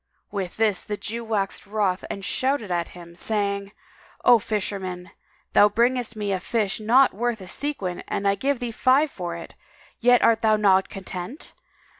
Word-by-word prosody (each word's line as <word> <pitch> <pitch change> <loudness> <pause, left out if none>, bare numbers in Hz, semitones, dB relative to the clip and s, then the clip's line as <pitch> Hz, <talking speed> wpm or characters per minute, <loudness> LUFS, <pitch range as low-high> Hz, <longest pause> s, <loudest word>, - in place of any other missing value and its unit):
With 195 -3 -4
this 215 -4 +2
the 210 -1 -5
Jew 230 +3 -5
waxed 205 -3 -2
wroth 200 -3 0
and 195 -1 -5
shouted 260 -6 0
out 175 - +2
at 170 - -4
him, 170 -1 -12
saying, 200 0 -1 0.5
"O 240 -2 +7
fisherman, 190 -4 -4 0.4
thou 205 - +7
bringest 240 +2 +1
me 205 -2 -2
a 190 - 0
fish 210 +1 -1
not 245 +5 +4
worth 235 +1 -1
a 185 - -10
sequin 195 -7 -3
and 200 - -1
I 200 - +4
give 270 +7 0
thee 245 -1 -3
five 270 +6 +3
for 175 -2 -5
it; 170 - -9 0.5
yet 245 0 +5
art 225 -1 +4
thou 220 -1 +4
not 195 -3 +3
content! 195 - -7
210 Hz, 175 wpm, -24 LUFS, 190-235 Hz, 0.5 s, O